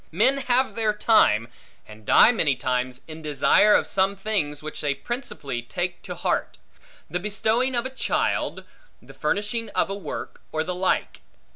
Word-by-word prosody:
Men 235 - +3
have 260 0 +1
their 220 -2 +1
time, 210 - +4 0.4
and 105 0 -14
die 230 - +7
many 155 - +1
times, 125 0 -2
in 160 0 -9
desire 155 +7 +4
of - - +3
some 195 +1 +1
things 185 -8 -2
which 155 - -6
they 145 -2 0
principally 145 - -5
take 175 +8 -4
to - - -7
heart; - - -2 0.5
the 180 - -3
bestowing 220 +6 0
of 240 +1 0
a 260 - -4
child, 265 - -1 0.4
the - - -15
finishing 225 +2 -2
of - - +1
a - - -1
work, 200 - -7
or 155 0 -1
the 180 +2 -3
like. 185 +1 -1
190 Hz, 165 wpm, -24 LUFS, 145-225 Hz, 0.5 s, die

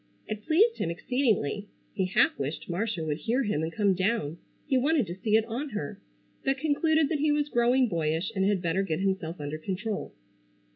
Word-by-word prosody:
It 215 -1 -4
pleased 425 +9 +4
him 165 - 0
exceedingly. 205 - 0 0.3
He 190 - 0
half 185 - +3
wished 140 +3 -4
Marcia 180 -1 -2
would 150 0 -2
hear 240 - +1
him 205 -9 0
and 160 +1 -2
come 200 0 +2
down. 185 -4 -1 0.3
He 280 - +1
wanted 280 0 +3
to 175 - -5
see 210 +3 +1
it 220 0 +4
on 255 +6 -4
her, 205 - -5 0.4
but 270 0 +1
concluded 315 +2 +2
that 315 - 0
he 300 +1 +3
was 295 0 +1
growing 245 +1 +3
boyish 165 0 -1
and 190 - +1
had 195 -2 +1
better 170 +3 +1
get 175 -5 -1
himself 190 -4 -1
under 145 +1 -4
control. 195 +5 -3
205 Hz, 195 wpm, -28 LUFS, 170-260 Hz, 0.4 s, pleased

